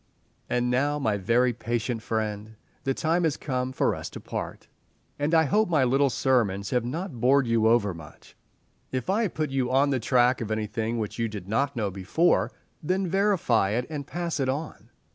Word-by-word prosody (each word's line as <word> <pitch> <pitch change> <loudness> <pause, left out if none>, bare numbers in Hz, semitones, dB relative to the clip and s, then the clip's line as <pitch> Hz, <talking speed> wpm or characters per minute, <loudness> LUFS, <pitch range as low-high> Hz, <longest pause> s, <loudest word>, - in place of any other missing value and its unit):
And 125 0 +1
now, 145 +4 +1
my 110 -8 0
very 120 +5 +2
patient 120 0 -2
friend, 110 -1 -3 0.3
the 135 0 0
time 165 +2 +1
has 160 -3 +1
come 130 -2 -2
for - - +1
us - - -6
to - - -9
part, - - -6 0.5
and 145 +2 0
I 160 - +6
hope 210 +6 +2
my 155 -6 +3
little 135 +2 +3
sermons 110 -7 +1
have 125 -2 +1
not 140 - -5
bored 135 +2 +4
you 115 -1 +2
over 110 -4 +3
much. 80 -2 -14 0.6
If 130 +6 -1
I 210 +4 +2
have 210 -7 -2
put 155 -3 -1
you 130 -2 0
on 135 +2 +3
the 130 - +1
track 125 +1 +3
of 110 - -4
anything 110 +1 -2
which 110 0 -4
you 115 - +1
did 105 -4 -7
not 135 +7 0
know 105 -4 -1
before, 100 - +1 0.3
then 185 +4 0
verify 175 - +2
it 125 +2 0
and 145 -2 -5
pass 170 -2 -3
it 130 -1 0
on. 145 +4 -5
125 Hz, 195 wpm, -26 LUFS, 110-145 Hz, 0.6 s, I